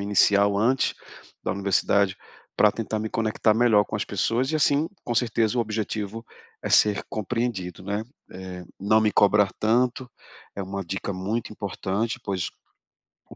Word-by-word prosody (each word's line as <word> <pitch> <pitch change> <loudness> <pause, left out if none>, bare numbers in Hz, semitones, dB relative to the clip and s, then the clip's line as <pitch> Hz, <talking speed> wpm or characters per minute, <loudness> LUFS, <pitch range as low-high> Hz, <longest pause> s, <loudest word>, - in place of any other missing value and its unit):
inicial 100 0 +3
antes 125 +5 +2 0.5
da - - 0
universidade, 100 0 +1 0.4
pra 105 -1 +5
tentar 110 -1 -3
me 110 0 -4
conectar 110 -1 +1
melhor 110 -2 +4
com 105 - -8
as - - -2
pessoas 115 +6 0
e 155 - +1
assim, 145 +1 +2 0.2
com 120 - -2
certeza, 115 0 +1
o - - +4
objetivo 110 0 -3 0.4
é - - -3
ser 105 -1 +4
compreendido, 110 -5 -3
né. 100 +2 -2 0.3
Eh, 90 -1 -8 0.2
não 110 +2 +4
me 110 -1 +2
cobrar 100 -1 +4
tanto, 125 +3 +1 0.5
é 100 - -3
uma 100 +1 -4
dica 95 +3 -4
muito 105 +5 -3
importante, 105 +3 -3
pois 95 -3 -2 0.8
o - - -12
105 Hz, 155 wpm, -25 LUFS, 100-115 Hz, 0.8 s, pra